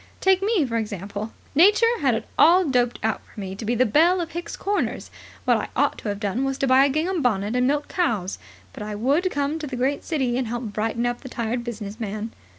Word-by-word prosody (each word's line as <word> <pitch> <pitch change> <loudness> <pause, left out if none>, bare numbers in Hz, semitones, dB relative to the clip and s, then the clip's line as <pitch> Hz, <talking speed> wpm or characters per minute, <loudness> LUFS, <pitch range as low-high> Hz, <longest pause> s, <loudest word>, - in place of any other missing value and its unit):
Take 380 0 +3
me, 400 -6 +2
for 230 -2 -2
example. 205 0 -4 0.2
Nature 420 +9 +5
had 265 -6 +2
it 225 - -4
all 355 +3 +6
doped 245 -4 +1
out 220 -1 0
for - - -14
me 190 -1 -5
to 205 - -8
be 235 +3 0
the 255 +2 +3
Belle 330 - +4
of 335 -1 -3
Hicks 345 +1 -5
Corners. 405 +1 -2 0.3
What - - +4
I - - -3
ought - - +1
to 210 - -4
have 200 0 -3
done 210 +5 -1
was 270 0 -1
to 275 - 0
buy 260 +1 +6
a - - +2
gingham 325 +5 0
bonnet 215 -3 0
and 250 0 +2
milk 290 +1 0
cows. 220 - -1 0.3
But - - -9
I 210 0 -4
would 280 - +1
come 285 0 -1
to 305 - -5
the 260 - -5
great 265 +3 0
city 260 -6 0
and 255 - -2
help 240 +2 -3
brighten 225 +3 -1
up 240 0 -2
the 260 - -9
tired 235 0 -2
business 215 -2 -6
man." 215 0 -4
250 Hz, 240 wpm, -24 LUFS, 220-310 Hz, 0.3 s, all